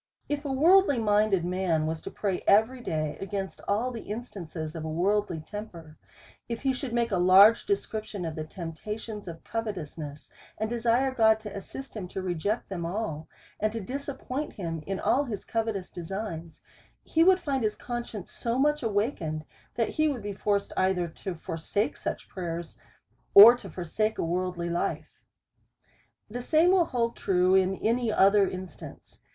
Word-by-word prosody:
If 290 0 -3
a 280 - -1
worldly 330 +2 +5
minded 210 -4 +2
man 180 -3 0
was 160 0 -3
to - - -6
pray 195 -3 -2
every 225 +5 +4
day 155 -7 -2
against 195 -1 -4
all 225 +5 +1
the 230 -2 -6
instances 175 -8 -6
of 160 - -5
a 160 - -4
worldly 180 +1 0
temper; 165 -4 -9 0.5
if 230 +2 -4
he 270 -1 +2
should 255 -1 -4
make 235 -1 0
a 190 - +2
large 195 +5 +7
description 215 - -2
of 160 - -3
the 155 - -4
temptations 200 +6 -6
of 165 -1 -8
covetousness, 170 -9 -5 0.3
and 220 +1 -2
desire 240 +3 +2
God 220 -3 +4
to 210 -2 -8
assist 260 +7 -8
him 200 -4 -5
to 190 - -5
reject 185 +5 -1
them 180 -3 -4
all, 170 -4 -3 0.3
and 215 0 +1
to 230 - -3
disappoint 275 +4 -5
him 165 -4 -4
in 195 -1 -2
all 280 +3 +2
his 210 -6 -5
covetous 220 -5 -2
de 175 - -7
signs, 170 -4 -6 0.4
he 325 - +3
would 375 +1 +6
find 275 -7 -1
his 210 -1 0
conscience 240 -5 -6
so 235 +1 -2
much 295 +2 +2
awaken 205 - -1
ed, - - -21 0.3
that 230 - +1
he 310 0 +1
would 265 -8 -2
be 205 0 -4
forced 200 0 -1
either 185 -2 +1
to 175 +3 -6
forsake 165 +5 -2
such - - -5
prayers, 170 -2 -6 0.6
or 220 +4 +12
to 245 - -10
forsake 215 +5 -2
a - - -1
worldly 175 0 -2
life. 170 - -3 1.1
The 245 +4 -5
same 320 +7 +4
will 370 -3 +4
hold 235 -5 -1
true, 185 -1 +2
in 190 0 +3
any 230 0 +2
other 200 0 +5
instance. 185 -3 -10
205 Hz, 170 wpm, -28 LUFS, 175-235 Hz, 1.1 s, or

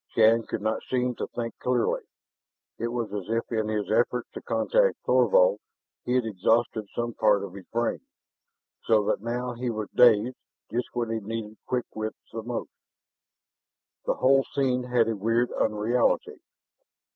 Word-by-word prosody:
Shann 115 0 +5
could 105 - -4
not 110 0 0
seem 125 -1 +1
to - - -3
think 115 -1 -4
clearly. 125 -2 +1 0.8
It 115 - -1
was 120 -3 -3
as 100 -1 -5
if 115 +1 -1
in 110 -2 0
his 105 -1 -2
efforts 120 +2 +1
to - - -8
contact 485 - +2
Thorvald, - - +4 0.5
he 125 - 0
had 125 -2 +2
exhausted 110 +1 +1
some 120 0 -2
part 105 -3 +3
of 100 - -7
his 100 -1 -11
brain, 120 0 -1 0.8
so 110 -2 +3
that - - 0
now 120 +2 -3
he 120 +1 -3
was 110 -2 -4
dazed 120 0 +5 0.3
just 120 +2 -1
when 120 -2 -2
he 115 - -1
needed 110 0 -5
quick 125 -1 -1
wits 110 0 -4 0.2
the 115 - -4
most! 120 +1 -5 1.4
This - - +2
whole 135 +1 +4
scene 130 -3 +1
had 125 -2 +2
a 115 - 0
weird 115 +4 +1
unreality. 110 +3 0
115 Hz, 160 wpm, -27 LUFS, 110-125 Hz, 1.4 s, Shann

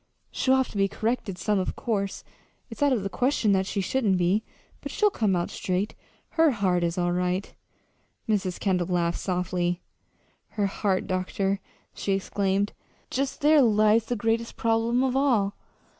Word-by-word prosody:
She'll 260 0 +2
have 265 -2 +1
to - - -7
be 195 0 +3
corrected, 215 -1 -2
some, 205 +2 +1
of 185 - -2
course; 200 -4 -2 0.5
it's - - -9
out 285 -1 +4
of 235 -7 +1
the - - -1
question 245 -2 +1
that 190 -1 +2
she 200 - -1
shouldn't 200 -1 +1
be. 180 +5 +2 0.4
But - - -6
she'll 420 -1 +2
come 210 - +1
out 175 0 -1
straight. 185 +3 -2 0.4
Her 325 -1 +4
heart 190 -8 +1
is 170 +1 -1
all 175 -1 +1
right." 180 +2 -1 0.7
Mrs. 190 -4 0
Kendall 180 -3 0
laughed 175 -1 0
softly. 180 -1 -1 0.7
"Her 205 - +2
heart, 195 -1 0
doctor!" 195 +1 -1 0.3
she 195 - -1
exclaimed. 195 +1 0 0.4
"Just 275 +1 -2
there 300 0 +6
lies 215 -1 +4
the 245 - -2
greatest 230 +1 -1
problem 230 +2 +2
of 260 -1 0
all. 235 -8 +2
200 Hz, 165 wpm, -26 LUFS, 185-230 Hz, 0.7 s, there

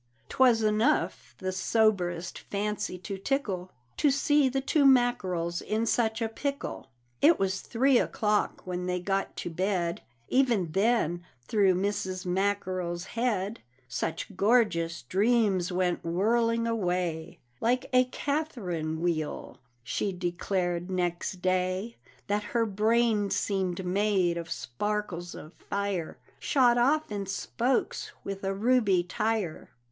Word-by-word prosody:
'Twas 245 -4 +4
enough 215 +1 +1
the 185 0 -3
soberest 185 -3 +1
fancy 210 -1 -3
to 190 +2 -6
tickle 195 -7 -2 0.3
To 295 - +4
see 290 0 +3
the 270 +1 0
two 280 +2 +2
Mackerels 190 -10 +2
in 220 +2 -1
such 225 -1 +1
a - - +1
pickle! 280 +5 -4 0.3
It 320 +2 +6
was 190 0 -1
three 250 +2 +3
o'clock 210 -1 0
when 180 0 -3
they 180 0 0
got 195 +2 -2
to 175 - -5
bed; 175 -1 -1 0.3
Even 235 - +2
then 195 -3 +1 0.2
through 195 -4 +3
Mrs. 190 -1 -2
Mackerel's 185 -2 -1
head 225 -3 -1 0.3
Such 165 +8 -4
gorgeous 195 - +2
dreams 195 - +2
went 180 -1 0
whirling 230 +7 +1
away, 180 -7 -1 0.2
"Like 245 +2 +1
a 255 0 +6
Catherine 210 - -3
wheel," 160 -3 -2 0.2
she 200 +10 -1
declared 175 0 -2
next 180 0 -2
day, 185 +4 0 0.3
"That 205 0 0 0.2
her 230 - +3
brain 215 0 +2
seemed 190 -3 -1
made 190 -2 +2
of 170 -1 -5
sparkles 175 +5 -3
of 155 - -10 0.2
fire 200 -5 -2 0.2
Shot 245 -3 +3
off 290 +2 +2
in 200 -2 -3
spokes, 240 +6 -1
with 195 0 -5
a 195 0 -1
ruby 210 -4 +3
tire." 210 -2 -2
195 Hz, 125 wpm, -28 LUFS, 180-230 Hz, 0.3 s, It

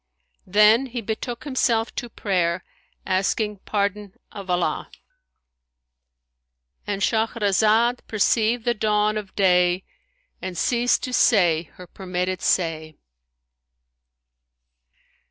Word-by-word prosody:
Then 210 +6 +5
he 245 -1 -5
betook 230 +2 -5
himself 240 -5 0
to 240 - -5
prayer, 180 -5 -1 0.4
asking 205 +3 0
pardon 205 0 -2 0.2
of 200 -3 -9
Allah'—And 60 - -8
Shahrazad 220 +1 +2
perceived 220 +2 +1
the 240 - +2
dawn 210 -1 +1
of 205 -3 -6
day 180 -1 +3 0.6
and 185 -2 -6
ceased 245 +4 +1
to 255 - -4
say 175 -10 +3
her 180 - -11
permitted 180 0 -4
say. 160 -3 -1
200 Hz, 90 wpm, -23 LUFS, 175-225 Hz, 0.6 s, Then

